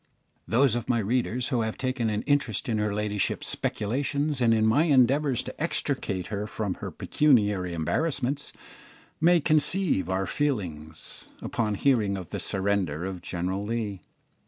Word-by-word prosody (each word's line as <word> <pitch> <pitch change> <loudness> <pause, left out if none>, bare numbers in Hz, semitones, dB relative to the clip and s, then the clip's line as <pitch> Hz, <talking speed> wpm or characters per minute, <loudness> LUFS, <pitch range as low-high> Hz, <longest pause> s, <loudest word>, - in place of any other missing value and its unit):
Those 125 +1 +3
of 120 -2 -3
my 120 - +3
readers 120 +3 0
who 125 -4 +1
have 110 0 -2
taken 130 -3 -1
an 105 0 -1
interest 140 -8 0
in 110 -3 0
her 105 0 0
ladyship's 105 -1 -1
speculations 140 +5 -1
and 115 -1 +4
in 110 -1 +3
my 125 +9 +4
endeavours 135 -2 +3
to - - -8
extricate 95 -2 -1
her 105 +1 -2
from 105 -3 -2
her - - -3
pecuniary 105 - +2
embarrassments, 140 - -1 0.7
may 175 +2 +5
conceive 155 - +2
our 95 +1 0
feelings 85 - -3
upon 105 -2 -1
hearing 105 -5 +2
of 90 -4 -8
the - - -4
surrender 95 -5 0
of 95 -2 -5
General 95 +3 -3
Lee. 105 -3 -3
110 Hz, 150 wpm, -27 LUFS, 100-135 Hz, 0.7 s, may